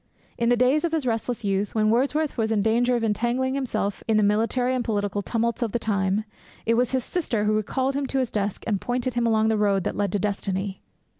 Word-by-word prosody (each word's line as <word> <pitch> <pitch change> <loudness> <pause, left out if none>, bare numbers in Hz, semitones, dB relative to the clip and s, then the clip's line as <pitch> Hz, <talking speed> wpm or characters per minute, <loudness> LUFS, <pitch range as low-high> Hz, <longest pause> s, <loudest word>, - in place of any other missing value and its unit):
In 235 0 +1
the 245 - +4
days 255 +6 +3
of 335 -1 -1
his 315 -5 0
restless 230 0 -2
youth, 200 +1 -1
when 215 -1 +3
Wordsworth 285 +6 +1
was 225 -2 0
in 210 -2 +2
danger 240 +3 +2
of 235 - -1
entangling 240 +4 0
himself 255 -7 -2
in 220 -1 +3
the 215 - +4
military 230 +5 +2
and 255 -1 0
political 205 -2 -1
tumults 235 +3 -1
of 230 -4 -1
the - - +2
time, 200 -2 0 0.4
it 230 - +3
was 245 +1 +2
his 260 -2 0
sister 260 - -1
who 210 0 +2
recalled 260 +6 0
him 280 -1 -1
to 270 - -2
his 255 -3 0
desk 205 -1 -2
and 205 -4 -1
pointed 250 +1 -1
him 240 0 +1
along 220 -1 +3
the 220 - +2
road 200 -3 +2
that - - -2
led 200 -2 0
to - - +2
destiny. 195 -1 -2
225 Hz, 235 wpm, -25 LUFS, 210-250 Hz, 0.4 s, the